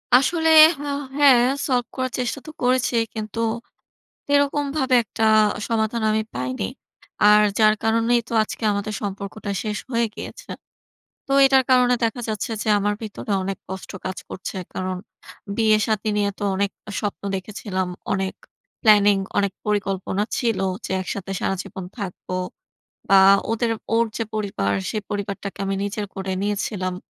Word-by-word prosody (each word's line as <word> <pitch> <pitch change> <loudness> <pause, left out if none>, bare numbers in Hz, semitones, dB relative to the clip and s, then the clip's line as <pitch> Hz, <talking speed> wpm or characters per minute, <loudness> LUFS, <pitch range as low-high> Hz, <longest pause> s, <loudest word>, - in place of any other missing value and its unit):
আসলে 320 +5 +3 0.3
হা 290 0 -4 0.3
হ্যাঁ। 270 -5 +6 0.2
solve 250 -3 +1
করার 255 0 -2
চেষ্টা 250 +2 -2
তো - - -6
করেছি। 255 0 +2 0.2
কিন্তু 215 0 -5 0.9
সেরকম 285 0 +2
ভাবে 265 -3 +2
একটা 220 +2 -2 0.4
সমাধান 225 0 0
আমি 215 0 +1
পাইনি। 125 -2 -3 0.7
আর 210 0 +7 0.2
যার 215 -1 +5
কারণেই 230 +2 +3
তো - - -8
আজকে 215 - -5
আমাদের 205 +1 -3
সম্পর্কটা 200 +1 -5
শেষ 210 -1 -3
হয়ে 235 -2 +2
গিয়েছে। - - -9 0.8
তো 275 - -3
এটার 265 -1 +4
কারণে 250 -1 +5
দেখা 230 +1 0
যাচ্ছে 215 +1 -3
যে - - -4
আমার 205 +1 0
ভিতরে 215 -1 -5
অনেক 195 +1 -3
কষ্ট 190 0 -7
কাজ 185 0 -3
করছে। 190 - -6 0.2
কারণ 185 0 -2 0.6
বিয়ে-শাদি 215 -1 +2
নিয়ে 205 -1 +1
তো - - -7
অনেক 200 +1 0 0.2
আ - - -5
স্বপ্ন 205 -2 -4
দেখেছিলাম। 190 -1 -4 0.2
অনেক 190 0 -1 0.5
planning, 205 -3 +6 0.2
অনেক 200 -1 +1
পরিকল্পনা 195 -1 -1
ছিল 230 -5 0 0.3
যে - - -6
একসাথে 195 +1 -5
সারাজীবন 195 0 -3
থাকবো। 185 -2 -5 0.8
বা 195 0 +7 0.3
ওদের 230 +1 0 0.2
ওর 230 +1 +4
যে 230 - 0
পরিবার, 195 - -1 0.2
সে - - -3
পরিবারটাকে 200 -1 -4
আমি 195 0 -1
নিজের 205 +1 -3
করে 190 -1 -4
নিয়েছিলাম। 200 -2 -2
210 Hz, 145 wpm, -22 LUFS, 195-235 Hz, 0.9 s, আর